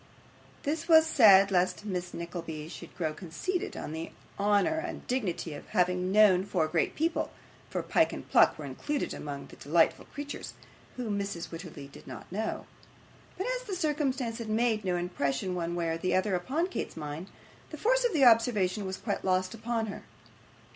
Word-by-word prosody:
This 315 +3 -2
was 320 -2 +7
said 200 -10 +7
lest 185 +2 +1
Miss 180 -3 -3
Nickleby 170 -3 -6
should - - -10
grow 160 -3 -1
conceited 190 - -4
on - - -5
the 160 +1 -5 0.3
honour 205 +10 +3
and 345 +2 -6
dignity 195 - -2
of 145 - -9
having 180 +1 +1
known 200 -3 +6
four 180 -5 0
great 165 0 0
people 325 +2 0 0.4
(for - - -2
Pyke - - +3
and - - -7
Pluck - - +5
were - - -6
included 295 -1 -3
among 140 -1 -6
the - - -14
delightful 165 +3 +2
creatures), 290 0 -7 0.4
whom 215 -5 -2
Mrs. 195 -4 -4
Wititterly 165 -4 -8
did 140 - -15
not - - -9
know. 220 +4 -3 0.7
But 380 - -2
as - - -7
the 390 - -2
circumstance 280 -8 -1
had 225 -2 -5
made 220 -1 +1
no 180 -2 0
impression 175 -2 -1
one 170 -1 -2
way 170 -1 -1
or 165 +3 +1
other 190 +1 0
upon 260 - 0
Kate's 370 - -4
mind, 150 +3 -5 0.4
the - - -7
force - - +2
of 485 - +2
the 285 -5 +5
observation 215 -4 +4
was 190 0 -4
quite 205 -3 -3
lost 185 +1 +1
upon 230 0 -2
her. 200 - -6
195 Hz, 175 wpm, -30 LUFS, 175-250 Hz, 0.7 s, was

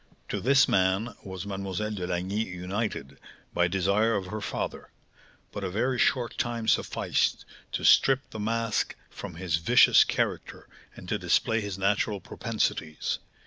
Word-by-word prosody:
To - - -2
this 135 +3 +5
man 95 +5 +1
was 95 -2 -7
Mlle. 100 -1 -5 0.2
de 95 -4 -4
Lagny 95 +5 -1
united, 90 -6 -4 0.3
by 85 - +3
desire 100 +5 +2
of 100 -2 -2
her 105 +4 -5
father; - - -4 0.6
but 100 - -6
a 95 - -2
very 120 +6 0
short 120 -3 +1
time 115 -2 -2
sufficed - - +1 0.3
to - - -2
strip 135 0 +5
the 110 - -7
mask 115 0 -1 0.2
from - - -8
his 85 -2 -1
vicious 80 - +6
character, - - -3 0.3
and - - -11
to - - -1
display 115 0 +2
his 100 -2 -5
natural 100 +1 +1
propensities. 80 -3 -2
100 Hz, 145 wpm, -27 LUFS, 95-115 Hz, 0.6 s, vicious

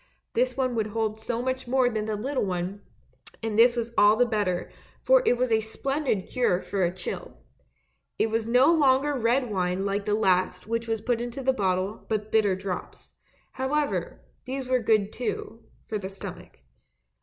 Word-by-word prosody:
This 250 +2 +1
one 255 -2 0
would 220 -2 0
hold 220 0 -2
so 235 +1 -3
much 260 0 -2
more 255 0 +3
than 215 -3 -1
the 215 -1 -2
little 260 +6 -1
one, 185 +1 -3 0.6
and 225 -2 -2
this 235 +2 +6
was 235 -1 -3
all 205 +1 +6
the 245 +2 +4
better, 205 -6 -1 0.3
for - - +5
it 245 - +4
was 255 +1 +1
such 220 -1 +3
a - - -3
splendid 265 -1 -2
cure 240 -8 +1
for 200 - -2
a 175 - +2
chill. 185 0 -6 0.8
It 225 - +1
was 225 0 0
no 255 +7 +5
longer 285 -2 +3
red 245 -1 +1
wine 185 0 -1
like 200 0 -1
the 210 - +1
last 185 -3 +1
which 230 +1 -2
was 225 -1 -1
put 240 -2 0
into 245 +3 -5
the 265 +1 +3
bottle 190 -1 -1
but 215 -1 -2
bitter 210 -4 +3
drops; 190 -1 -6 0.3
however, 290 +3 -2 0.2
these 260 0 -4
were 255 0 +2
good 215 -3 +2
too 225 -1 -4
— - - -34
for 215 - -2
the 190 -1 -5
stomach. 195 - -8
225 Hz, 190 wpm, -26 LUFS, 205-255 Hz, 0.8 s, this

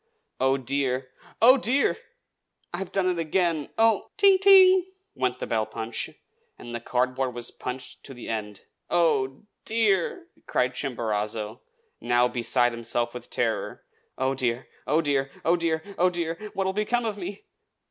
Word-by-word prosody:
Oh, 135 +1 +3
dear! 130 -1 -1 0.3
oh, 255 +3 +8
DEAR! 260 +3 +2 0.8
I've 185 +1 -4
done 195 -2 +1
it 180 -2 0
again! 165 -2 0
oh 225 -2 +3
" - - -52
"Ting! 395 -2 +6
ting!" 375 -1 +7 0.3
went 130 -2 -1
the - - -4
bell 110 -1 0
punch; 110 0 -4 0.5
and 120 - -9
the 120 - -3
cardboard 130 +1 -1
was 120 0 -5
punched 125 0 -6
to 135 - -8
the 120 - -9
end. 105 -3 -4 0.3
"Oh, 135 -5 +1 0.2
dear!" 220 - +1 0.2
cried 125 0 +1
Chimborazo, 110 -4 -3 0.4
now 120 +1 +3
beside 120 0 +1
himself 120 0 -2
with 125 -1 -9
terror. 115 -2 -2 0.3
"Oh, 130 +1 +1
dear! 125 -1 -1 0.2
oh, 155 +2 +3
dear! 140 -3 0 0.2
oh, 170 - +4
dear! 165 -2 -1 0.2
oh, 180 +1 +5
dear!! 170 -2 -2 0.2
what 195 - 0
will 190 - 0
become 220 +4 0
of 215 -2 -1
me?" 195 +2 -6
135 Hz, 155 wpm, -26 LUFS, 120-190 Hz, 0.8 s, oh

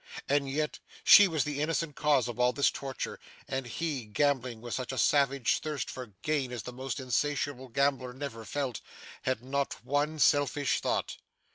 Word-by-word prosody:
And 140 -1 +1
yet 150 +2 -2 0.2
she 205 - +9
was 160 -5 0
the 145 -1 -3
innocent 160 -1 -1
cause 150 -5 +2
of 120 0 -6
all 125 0 +4
this 140 - +3
torture, 135 -1 -5 0.3
and 135 -2 -3
he, 145 -2 -3
gambling 125 +1 0
with 120 +1 -6
such 130 -1 -3
a 130 - -5
savage 140 -3 +3
thirst 150 -3 -3
for 130 -1 -7 0.2
gain 145 -5 0
as 120 -4 -5
the 125 - -7
most 130 +2 -4
insatiable 130 +1 -1
gambler 135 0 0
never 130 -3 -6
felt, 135 +1 -3 0.4
had 130 -2 -1
not 140 +2 -2
one 145 +2 0
selfish 145 -1 +2
thought! - - -1
140 Hz, 170 wpm, -30 LUFS, 125-145 Hz, 0.4 s, she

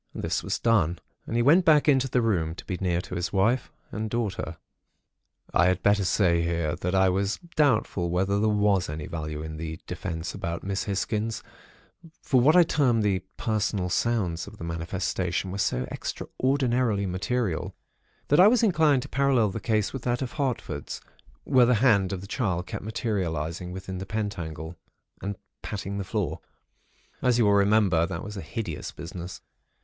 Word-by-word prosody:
This - - -1
was - - -2
done, 90 -8 +2 0.3
and - - -3
he 120 - +3
went 165 +8 +6
back 155 -3 +5
into 135 -2 +4
the 125 -1 +2
room, 85 -8 0
to - - -10
be 90 - -3
near 90 -2 +1
his 90 -1 -3
wife 110 +6 +1 0.2
and 110 0 -3
daughter. 105 -7 -3 1.0
"I 90 - +5
had 90 0 +1
better 100 -1 +4
say 85 -2 +3
here, 85 -2 -1
that 90 +2 -2
I 95 0 +5
was 95 +2 0 0.2
doubtful 110 - +2
whether 95 +3 +1
there 110 +1 +2
was 105 -4 +2
any 75 0 -5
value 75 -2 -5
in 80 0 -6
the 80 0 -5
'defense' 80 -1 -4
about 85 0 -4
Miss 95 0 -2
Hisgins; 105 +2 -2 0.8
for 130 -4 +2
what 150 +6 +5
I 180 - +8
term 130 -8 +2
the 100 -3 +2 0.2
'personal 105 -4 -1
sounds' 95 -5 0
of 105 - -11
the - - -8
manifestation 90 +2 -2
were 100 - -4
so 65 -10 +1
extraordinarily 125 -6 0
material, 95 0 -2 0.5
that 145 - +5
I 185 - +9
was 240 +1 +4
inclined 155 - +4
to - - -8
parallel 135 -5 +3
the - - -4
case 110 -3 0
with 135 - -4
that 120 +2 -1
of 125 - -5
Hartford's, 125 - -3 0.4
where 130 -4 +4
the 125 - +4
hand 105 -5 +3
of 95 -2 -3
the - - -8
child 100 -7 -1
kept - - -6
materialising 90 -6 -2
within 95 0 -6
the 95 - -6
pentacle, 85 -7 -4 0.4
and 100 +1 -3 0.3
patting 100 -1 -4
the - - -2
floor. 90 -5 -2 0.8
As 125 -2 +3
you 120 - +4
will 100 - +4
remember, 100 -4 +4
that 85 -2 -5
was 105 +1 -7
a 95 - -5
hideous 85 -1 -5
business. 85 +1 -8
100 Hz, 175 wpm, -26 LUFS, 90-120 Hz, 1.0 s, I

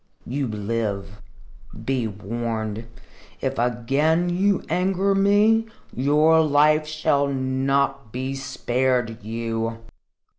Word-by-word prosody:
You 135 +2 -2
live. 105 -2 -3 0.6
Be 130 -3 0
warned. 110 +1 -4 0.5
If 135 -2 -2
again 135 +8 +1
you 190 +3 +1
anger 190 +2 +1
me, 205 +3 +3 0.3
your 150 +5 +4
life 150 +1 +3
shall 150 -2 +1
not 135 -1 0
be 130 +3 -3
spared 125 -3 -1
you." 115 +1 -3
135 Hz, 90 wpm, -23 LUFS, 115-155 Hz, 0.6 s, your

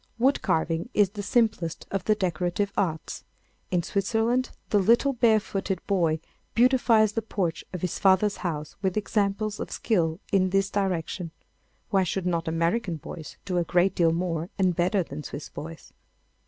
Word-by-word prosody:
Wood 265 +4 +3
carving 165 +5 0
is 200 -3 +4
the 205 0 -5
simplest 215 -7 0
of 195 - -2
the 215 - +3
decorative 185 +1 -1
arts. 160 -5 -2 0.5
In 175 -2 +1
Switzerland 225 +7 0 0.2
the 205 - +4
little 235 +8 +4
barefooted 215 -5 +1
boy 170 -5 +1 0.4
beautifies 235 -3 +4
the 225 - -1
porch 190 -6 -2
of 180 - -5
his 180 - -2
father's 195 +1 +4
house 155 -4 -4
with 190 0 0
examples 210 0 0
of - - -4
skill 170 -6 0
in 185 -1 +3
this 195 +1 +1
direction. 180 -3 -1 0.6
Why 195 - +4
should 185 0 -1
not 170 -2 0
American 170 +4 0
boys 160 0 -9
do 180 -3 0
a - - +2
great 175 +2 +2
deal 170 -3 +3
more 170 0 -2
and 185 -3 +2
better 180 +3 +2
than 150 -1 -7
Swiss 145 0 -7
boys? 165 +1 -9
190 Hz, 160 wpm, -26 LUFS, 170-210 Hz, 0.6 s, is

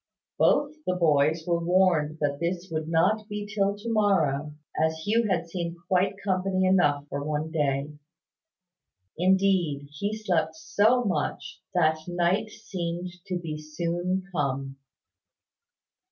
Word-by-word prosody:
Both 290 +1 +3
the 180 - +1
boys 155 -1 +3
were 170 -1 0
warned 170 -4 +3
that 145 -1 0
this 175 +2 -2
would 155 -1 -2
not 185 +7 +2
be 210 0 -4
till 200 -1 0
to 225 +2 -3
morrow, 155 -9 +1 0.2
as 160 +1 +1
Hugh 225 +2 +2
had 175 -3 0
seen 170 0 -4
quite 190 +2 +2
company 190 -1 +1
enough 150 -7 +3
for 140 0 -4
one 155 +1 -2
day. 145 -2 0 1.3
Indeed, 180 -6 +2
he 205 +8 -3
slept 165 -7 0
so 220 +9 +2
much, 180 -9 -2
that 160 -2 +3
night 175 +4 +1
seemed 180 -5 -5 0.2
to 180 - -1
be 160 -3 -5
soon 175 +4 -2
come. 135 -4 -2
175 Hz, 130 wpm, -27 LUFS, 155-190 Hz, 1.3 s, Both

